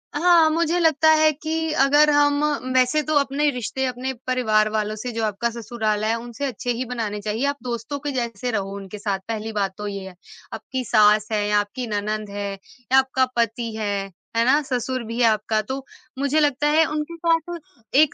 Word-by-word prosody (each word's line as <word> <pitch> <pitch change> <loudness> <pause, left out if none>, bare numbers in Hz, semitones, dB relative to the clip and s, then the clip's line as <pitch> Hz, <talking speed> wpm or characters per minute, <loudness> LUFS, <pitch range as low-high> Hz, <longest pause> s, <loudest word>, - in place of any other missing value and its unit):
हाँ, 330 0 +5
मुझे 335 +1 +1
लगता 315 -2 +4
है 310 0 +5
कि 320 +2 -3
अगर 290 +2 +5
हम 290 0 +3 0.3
वैसे 255 +4 +3
तो 310 +1 -1
अपने 280 +2 +1
रिश्ते 255 +1 -3
अपने 255 +1 -3
परिवार 220 -4 +2
वालों 215 0 -1
से 240 +3 -5
जो 225 0 -3
आपका 215 +3 -1
ससुराल 220 -2 -2
है 225 +1 +1
उनसे 240 +4 -6
अच्छे 245 -1 -3
ही 245 +2 -2
बनाने 225 -4 -3
चाहिए, 215 +5 -2
आप 285 0 0
दोस्तों 245 +3 -4
के 290 0 -3
जैसे 240 -2 -3
रहो 200 -3 -3
उनके 200 +1 -8
साथ, 200 -2 -2
पहली 225 -1 -4
बात 200 -2 -1
तो 210 0 -5
ये 195 -1 -5
है। 185 - -12 0.4
आपकी 260 -1 -4
सास 210 -1 +4
है 210 -1 0
या 210 0 +3
आपकी 205 +4 -4
ननंद 210 0 -3
है 200 0 -4
या 245 +6 -3
आपका 260 0 +1
पति 230 0 -1
है, 200 -2 -2 0.3
है 230 - +4
ना? 285 +4 +4
ससुर 255 -2 -2
भी 230 +1 -6
है - - +5
आपका 215 0 +1
तो 265 +5 -6 0.3
मुझे 280 +2 +2
लगता 295 -1 +2
है 310 +2 +4
उनके 305 +2 -3
साथ 335 +1 0 0.4
एक 295 +1 +5
245 Hz, 200 wpm, -23 LUFS, 215-285 Hz, 0.4 s, हाँ